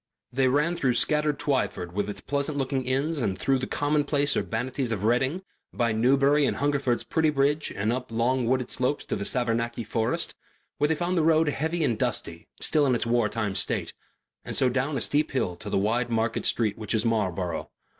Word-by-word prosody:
They 130 +1 +2
ran 150 +6 +2
through 130 -6 +1
scattered 150 +2 +2
Twyford 130 -12 -1
with 105 +3 -2
its 105 - -6
pleasant 140 +1 -2
looking 135 -1 -1
inns 140 +5 0
and 100 -6 -1
through 135 +6 +1
the 130 - -3
commonplace 145 -1 +1
urbanities 125 +2 -2
of 105 -3 -2
Reading, 130 - +1 0.3
by 120 -2 0
Newbury 135 +5 +3
and - - -1
Hungerford's 140 -4 0
pretty 160 -1 +1
bridge 145 +1 +1
and 105 +3 0
up 125 -1 -5
long 120 +2 +1
wooded 130 0 0
slopes 130 +3 -1
to - - -2
Savernake 120 0 0
forest, 110 +1 -1 0.5
where 150 - +3
they 160 - +1
found 175 +2 0
the - - +2
road 160 -1 +4
heavy 160 +3 -1
and 120 -7 0
dusty, - - -3
still 150 -2 +3
in 125 - +3
its 120 - -1
war 115 -2 +2
time 105 -3 -2
state, 95 - 0 0.5
and - - -5
so 130 - +3
down 135 +3 -1
a - - -2
steep 150 +5 +2
hill 95 -10 -1
to 105 +3 -6
the - - 0
wide 115 +5 0
market 115 0 0
street 110 -2 0
which 110 +1 -2
is 110 +1 +1
Marlborough. 95 -6 -1
130 Hz, 195 wpm, -26 LUFS, 115-145 Hz, 0.5 s, road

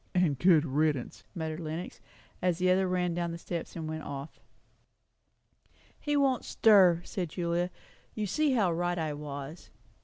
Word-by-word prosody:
"And 180 0 +4
a - - +2
good 165 -4 +6
riddance," 145 -2 -1
muttered 160 -1 -4
Lenox, 160 -7 -6 0.4
as 180 -2 +1
the 180 0 +2
other 190 +1 +3
ran 180 -1 0
down 170 0 -2
the 170 - -5
steps 170 0 -6
and 160 -2 -4
went 155 0 -4
off. 140 +1 -7 1.6
"He 295 -1 0
won't 270 -3 +2
stir," 185 -6 +5
said 180 -4 -3
Julia. 170 +1 -1 0.5
"You 215 - -1
see 295 +8 +1
how 205 -8 +2
right 175 +1 -1
I 155 -2 -2
was." 145 +2 -7
170 Hz, 160 wpm, -30 LUFS, 155-185 Hz, 1.6 s, good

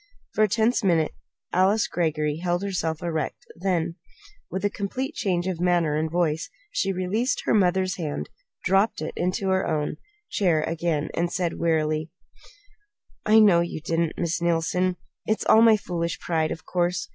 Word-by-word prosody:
For 215 - +3
a - - +5
tense 225 +3 +1
minute 165 -5 +2 0.4
Alice 195 +4 +3
Greggory 155 -3 -1
held 175 +2 -1
herself 170 -5 -2
erect; 160 -3 -3
then, 175 -2 -1 0.5
with 190 +2 -3
a - - +3
complete 255 +7 -3
change 180 -3 -1
of 185 -3 -2
manner 175 -4 +2
and 160 +1 0
voice, 160 -2 0 0.2
she - - 0
released 195 +7 -1
her - - +2
mother's 185 -2 +2
hand, 145 - -3 0.4
dropped 195 -2 +2
into 185 +2 -1
her 190 0 +1
own 150 -2 -1 0.3
chair 170 -6 +1
again, 165 -2 -1
and 170 +1 -1
said 175 -2 -2
wearily: 155 -1 +1 1.2
"I 215 +1 +6
know 195 -5 +6
you 170 -2 -3
didn't, 165 +1 -1
Miss 170 -1 -1
Neilson. 175 +2 +1 0.3
It's 215 - 0
all 220 - +6
my 225 -1 +7
foolish 170 -4 -3
pride, 160 -2 0
of 165 - -6
course. 180 +1 0
175 Hz, 160 wpm, -25 LUFS, 165-190 Hz, 1.2 s, my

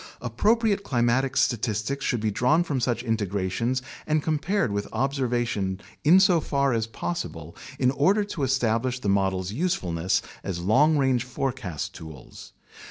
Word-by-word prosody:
Appropriate 205 - +1
climatic 130 -3 +1
statistics 120 +3 0
should 120 -4 0
be 110 -1 0
drawn 135 - +2
from 145 -6 -2
such 120 -1 -1
integrations 110 +2 -1 0.2
and 155 -1 +1
compared 160 - 0
with 100 0 -2
observation 120 -8 -1 0.2
insofar 160 - +4
as 110 -1 0
possible, 85 - -5 0.2
in 125 -1 +3
order 190 +10 +2
to 200 -6 -6
establish 125 -1 0
the 105 - -2
models' 95 -1 0
usefulness 95 - 0 0.2
as 95 -3 -3
long 130 - +3
range 130 -3 +2
forecast 125 - -4
tools. 80 -5 -11
125 Hz, 130 wpm, -25 LUFS, 105-145 Hz, 0.2 s, insofar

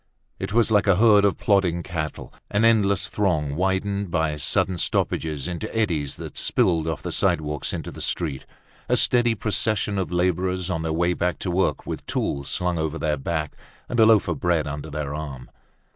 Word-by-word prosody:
It - - -4
was 115 +1 +3
like 105 -1 +3
a 100 - +5
herd 105 0 +5
of 100 - +2
plodding 90 -4 +1
cattle, 80 -4 -5 0.2
an 105 +2 +2
endless 100 -4 +3
throng 80 -9 0
widened 95 +2 -1
by 80 -3 0
sudden 85 +4 +1
stoppages 75 -4 -1
into 90 +4 -4
eddies 80 -11 0
that - - -8
spilled 85 -9 +1
off 80 -2 -3
the - - -4
sidewalks 75 -2 0
into - - -5
the - - -9
street, 75 -7 -2 0.4
a - - +3
steady 120 -2 +3
procession 105 -1 0
of 95 - -3
laborers 90 +1 0
on 80 -2 -1
their 80 0 -2
way 85 +2 +1
back 90 0 -1
to 90 - -3
work 95 +2 0
with - - -5
tools 70 -1 -2
slung 90 -2 -1
over 80 0 -2
their 75 -1 0
back 75 +2 -3 0.3
and 120 - -2
a 110 - +7
loaf 110 -3 +5
of - - -2
bread 85 -4 +1
under 75 +1 -5
their 75 -1 -4
arm. 70 -4 -7
90 Hz, 190 wpm, -24 LUFS, 80-100 Hz, 0.4 s, a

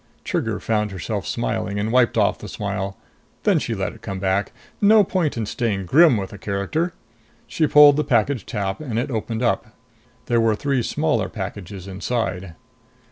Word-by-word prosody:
Trigger - - -2
found 105 -1 0
herself 95 -5 -4
smiling 95 +11 -2
and 105 +2 -1
wiped 120 -1 +3
off 105 -2 +2
the 105 - -8
smile. 100 -1 -4 0.5
Then - - +3
she - - -3
let - - -3
it - - -16
come 95 - -5
back. 95 +1 0 0.3
No 210 +1 +6
point 175 -8 -1
in 110 - -1
staying 100 -3 -2
grim 145 - +6
with 95 -2 -4
the 100 - -10
character! 105 - -2 0.5
She 155 - 0
pulled 145 0 +7
the 150 - +2
package 125 -3 +1
tab 100 +2 -3
and 125 -7 -4
it 125 +3 -1
opened 115 +1 -3
up. 120 - -1 0.5
There 120 -1 +2
were 110 -1 +3
three 135 +2 0
smaller 145 -6 0
packages 95 0 -7
inside. 95 -3 -3
110 Hz, 175 wpm, -22 LUFS, 100-135 Hz, 0.5 s, pulled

